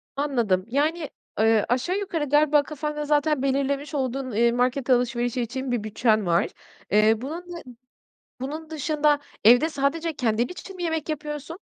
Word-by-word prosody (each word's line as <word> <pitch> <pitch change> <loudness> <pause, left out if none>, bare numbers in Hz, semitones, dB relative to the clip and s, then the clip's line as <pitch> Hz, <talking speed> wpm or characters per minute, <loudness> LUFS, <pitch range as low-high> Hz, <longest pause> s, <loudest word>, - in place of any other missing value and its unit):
Anladım. 235 -10 0
Yani, 300 +5 0 0.3
ııı, 220 -1 +4
aşağı 260 +10 0
yukarı 340 -7 -2
galiba 295 0 +4
kafanda 300 0 -4
zaten 295 -1 +2
belirlemiş 280 +2 -1
olduğun, 260 -1 -2
eee, 235 +2 +3
market 250 +2 0
alışverişi 245 0 +1
için 260 +2 -4
bir 235 -4 -1
bütçen 215 -1 +1
var. 170 0 +2 0.4
Eee, 215 +2 +4
bunun 320 +7 -5
dı 345 - -6 0.8
bunun 310 +4 -5
dışında 300 -1 +1 0.3
evde 245 +8 +7
sadece 315 +3 -1
kendin 235 -3 0
için 375 +1 -9
mi 355 - -6
yemek 320 -2 -2
yapıyorsun? 300 +2 -5
275 Hz, 150 wpm, -25 LUFS, 240-305 Hz, 0.8 s, evde